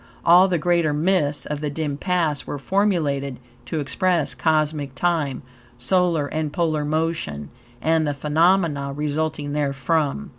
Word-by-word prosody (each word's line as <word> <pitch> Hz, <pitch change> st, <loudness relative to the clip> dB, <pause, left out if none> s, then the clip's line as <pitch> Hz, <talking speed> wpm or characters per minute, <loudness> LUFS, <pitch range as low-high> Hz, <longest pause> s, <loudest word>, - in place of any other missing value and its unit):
All 180 Hz, +3 st, +7 dB
the 180 Hz, -2 st, +1 dB
greater 170 Hz, -1 st, +1 dB
myths 150 Hz, -2 st, +1 dB
of 150 Hz, 0 st, -4 dB
the 150 Hz, -, -2 dB
dim 145 Hz, -1 st, -3 dB
past 165 Hz, -3 st, -1 dB
were -, -, -4 dB
formulated 145 Hz, -7 st, 0 dB, 0.3 s
to 160 Hz, -, -2 dB
express 150 Hz, -1 st, 0 dB
cosmic 150 Hz, 0 st, 0 dB
time, 155 Hz, -4 st, -1 dB, 0.3 s
solar 165 Hz, +4 st, +1 dB
and 155 Hz, +1 st, -3 dB
polar 155 Hz, -2 st, 0 dB
motion, 150 Hz, -, -2 dB, 0.3 s
and 160 Hz, 0 st, +2 dB
the 145 Hz, -, -1 dB
phenomena 150 Hz, -1 st, +1 dB
resulting 150 Hz, 0 st, -2 dB
therefrom. 145 Hz, -, -1 dB
150 Hz, 135 wpm, -22 LUFS, 145-170 Hz, 0.3 s, All